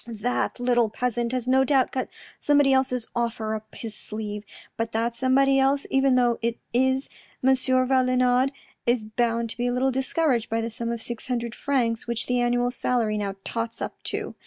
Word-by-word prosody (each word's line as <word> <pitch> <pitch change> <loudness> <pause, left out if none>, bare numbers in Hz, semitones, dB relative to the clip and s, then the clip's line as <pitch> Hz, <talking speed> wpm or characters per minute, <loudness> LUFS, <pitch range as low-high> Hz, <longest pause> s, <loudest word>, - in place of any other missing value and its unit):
" - - -25
That 235 +2 -2
little 240 -2 +2
peasant 240 +1 -1
has 255 -1 -2
no 265 +1 +4
doubt 265 -2 +2
got 255 - -2 0.3
somebody 290 -2 +4
else's 255 -3 0
offer 230 -2 -1
up 215 0 -7
his 225 -2 -6
sleeve, 210 -1 -5 0.3
but 225 0 -3
that 230 +1 0
somebody 270 +2 +3
else, 275 +1 +2
even 270 -1 +3
though 245 -2 +2
it's 235 0 -1 0.2
M. 260 +2 +3 0.9
Valenod, 255 0 +3 0.4
is 240 -2 +2
bound 230 +1 -1
to - - -7
be 245 0 0
a - - +1
little 260 +2 +1
discouraged 265 -2 +1
by 225 - 0
the 230 0 -3
sum 230 +1 -3
of 230 -1 -4
six 235 -2 -2
hundred 235 -2 -2
francs, 240 -6 -1
which 235 -1 -1
the 250 0 +1
annual 245 0 +1
salary 240 -4 0
now 200 -1 -3
tots 230 0 -3
up - - -5
to. - - -4
245 Hz, 185 wpm, -25 LUFS, 230-260 Hz, 0.9 s, no